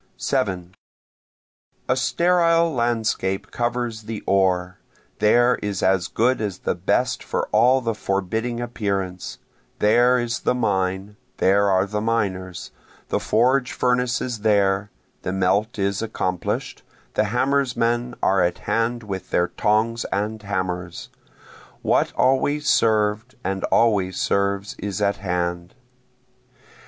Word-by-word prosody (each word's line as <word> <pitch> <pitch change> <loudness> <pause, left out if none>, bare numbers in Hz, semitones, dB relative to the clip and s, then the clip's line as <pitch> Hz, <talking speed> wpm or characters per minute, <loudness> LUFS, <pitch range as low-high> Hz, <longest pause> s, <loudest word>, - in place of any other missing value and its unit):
7 95 -9 -2 1.1
A 130 - +2
sterile 170 +4 +2
landscape 110 -5 -1
covers 120 -2 -2
the 110 -1 -6
ore, 90 -2 +1 0.4
there 120 +4 +4
is 100 -3 -3
as 95 -1 +2
good 125 +1 +1
as 100 -4 -3
the - - +2
best - - 0
for - - -2
all 130 +3 +4
the 115 -2 -1
forbidding 110 +4 -2
appearance, 100 -6 -3 0.4
There 120 +4 +4
is 120 0 -2
the - - 0
mine, 95 -3 -1 0.2
there 100 +1 +3
are 95 0 +3
the 105 +1 -3
miners, 95 -5 -2 0.4
The - - 0
forge 125 +3 +2
furnace 125 0 +1
is 120 -3 -3
there, 100 -1 +2 0.3
the - - -3
melt 95 +4 +1
is 100 0 -1
accomplish'd, 95 -5 -3 0.3
the 110 - +2
hammersmen 125 0 0
are 95 -1 +3
at 85 - +1
hand 115 +1 -1
with 95 -3 -6
their 90 0 +1
tongs 115 +2 +1
and 105 +2 -2
hammers, 90 -3 -4 0.7
What - - +2
always 145 +3 +1
served 110 +1 +2
and 95 +1 -2
always 100 -5 +2
serves 100 0 0
is 100 -2 -4
at 100 0 +1
hand. 90 -2 -3
105 Hz, 125 wpm, -22 LUFS, 95-120 Hz, 1.1 s, there